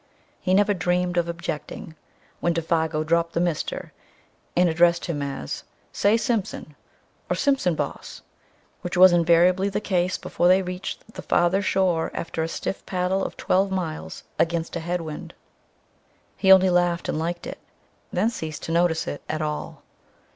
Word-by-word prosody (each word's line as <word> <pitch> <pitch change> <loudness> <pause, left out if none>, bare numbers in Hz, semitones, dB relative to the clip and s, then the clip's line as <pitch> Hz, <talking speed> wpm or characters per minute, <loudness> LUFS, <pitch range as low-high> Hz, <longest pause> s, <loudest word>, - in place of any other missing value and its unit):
He 185 0 +1
never 205 +1 +4
dreamed 180 0 0
of 170 -1 +1
objecting 165 -1 -5 0.5
when 170 -1 0
Défago 160 -2 0
dropped 170 +1 +1
the - - 0
"Mr.," 170 -3 -2 0.7
and 180 0 +5
addressed 170 +1 +3
him 155 -4 -3
as 140 - -4 0.3
"Say, 205 +3 +3
Simpson," 220 - -2 0.5
or - - +1
"Simpson, 270 - +1
boss," - - -5 0.6
which 175 +1 -4
was 185 0 +9
invariably 175 +3 +4
the 195 - -1
case 185 -3 0
before 175 - 0
they 185 +1 +5
reached 180 +4 -6
the - - -7
farther 175 +3 +2
shore 185 -4 +1
after 165 -1 -3
a 160 - 0
stiff 175 - -4
paddle 185 +1 0
of - - -5
twelve 195 +2 +2
miles 175 -5 -4 0.2
against 170 0 0
a - - -1
head 175 +1 -2
wind. 155 -2 -7 1.0
He 190 - +3
only 190 -1 +7
laughed, 175 -1 +1
and - - -1
liked 170 +2 -3
it; - - -7 0.5
then 225 - +1
ceased 155 -8 -6
to - - -4
notice 170 -1 +2
it 145 - -5
at 155 0 -1
all. 150 0 -5
175 Hz, 160 wpm, -24 LUFS, 165-185 Hz, 1.0 s, was